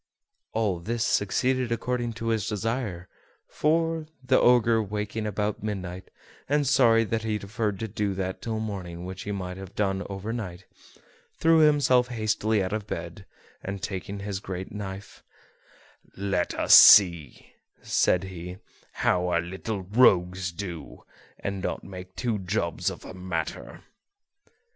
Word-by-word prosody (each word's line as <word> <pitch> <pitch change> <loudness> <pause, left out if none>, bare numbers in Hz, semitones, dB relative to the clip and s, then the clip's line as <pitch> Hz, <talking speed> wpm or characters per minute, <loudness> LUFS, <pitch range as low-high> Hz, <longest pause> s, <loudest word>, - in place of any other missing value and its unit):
All 105 -6 0
this 115 +6 -2
succeeded 125 +5 +1
according 120 0 -2
to 115 +1 -4
his 110 -2 0
desire; 105 -4 -3 0.4
for, 165 0 0 0.2
the 130 - +3
Ogre 120 -2 +4
waking 105 +1 -3
about 105 0 -2
midnight, 95 -3 -5 0.4
and 145 0 +2
sorry 120 -4 +5
that 115 0 -2
he 110 -1 -1
deferred 105 0 -3
to 110 - -2
do 105 -2 -2
that 95 0 -4
till 110 -1 -3
morning 90 -5 -5
which 95 0 -7
he 105 - -3
might 90 -2 -5
have 95 -1 -10
done 95 -2 0
over 100 +3 -4
night, 95 -6 -6 0.7
threw 165 0 +4
himself 140 -5 +4
hastily 110 -3 0
out 95 +2 -3
of 110 -1 -3
bed, - - -6 0.4
and, 95 0 -5
taking 100 +1 -5
his 100 -1 -4
great 95 -1 -6
knife, 100 -1 -7 1.0
"Let 95 -2 -1
us - - +3
see," 85 -9 +7 0.3
said 90 - +2
he, 90 -1 -7 0.3
"how 90 0 +1
our 85 -1 +2
little 95 +3 -5
rogues 95 -4 +3
do, 85 -4 -7 0.4
and 100 -1 -4
not - - -3
make 95 -1 -10
two 115 -4 -1
jobs 90 -2 -1
of - - -8
the - - -10
matter." 90 -3 -5
100 Hz, 145 wpm, -26 LUFS, 95-115 Hz, 1.0 s, see